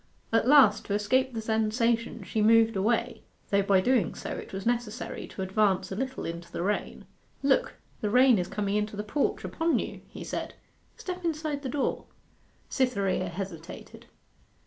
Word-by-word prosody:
At 225 +1 +3
last 260 -7 +6
to 200 - -1
escape 260 +6 +1
the 225 - -3
sensation 225 +1 0
she 210 +4 -2
moved 225 +1 +5
away, 215 +5 0 0.3
though 200 0 +4
by 195 -1 +3
so - - -9
doing 250 -8 +2 0.3
it - - -12
was 195 0 -6
necessary 240 -1 -2
to 190 - -6
advance 190 -1 +1
a - - -3
little 260 +4 -3
into 170 +1 -6
the - - -3
rain. 205 +2 -2 0.4
'Look, 475 - +2 0.3
the 210 - -1
rain 250 -1 +5
is 175 - -2
coming 205 0 -1
into 210 0 -2
the 210 - -3
porch 245 +7 -1
upon 330 0 0
you,' - - -4
he - - -8
said. - - -5 0.4
'Step 365 -1 -6
inside 310 -3 -2
the 265 - -4
door.' 280 +2 -1 0.6
Cytherea 200 -8 0
hesitated. 175 -2 -8
220 Hz, 170 wpm, -28 LUFS, 195-255 Hz, 0.6 s, last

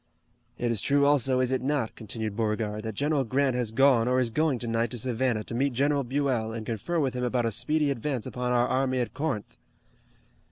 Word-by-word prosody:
"It 120 -1 0
is 110 -4 0
true 140 +4 +3
also, 135 -3 +3
is 130 0 0
it 130 - 0
not," 135 -3 -1
continued 110 -1 -5
Beauregard, 105 -1 -1
"that 110 -1 -5
General 145 +3 +1
Grant 130 +2 +1
has 120 -3 -1
gone 125 -1 +4
or 125 +1 +2
is 120 -3 0
going 155 0 +1
tonight 115 -1 -1
to 120 - -5
Savannah 120 -1 -1
to - - -6
meet 135 +3 +1
General 140 +3 +1
Buell, 130 -4 -1
and 110 -1 -5
confer 115 - -2
with 135 -4 0
him 125 0 -3
about 125 -1 0
a 115 - 0
speedy 145 +6 +1
advance 130 -1 -2
upon 125 0 -3
our 120 0 +3
army 130 0 +1
at 120 - -2
Corinth?" 140 -7 -3
125 Hz, 210 wpm, -27 LUFS, 115-140 Hz, -, gone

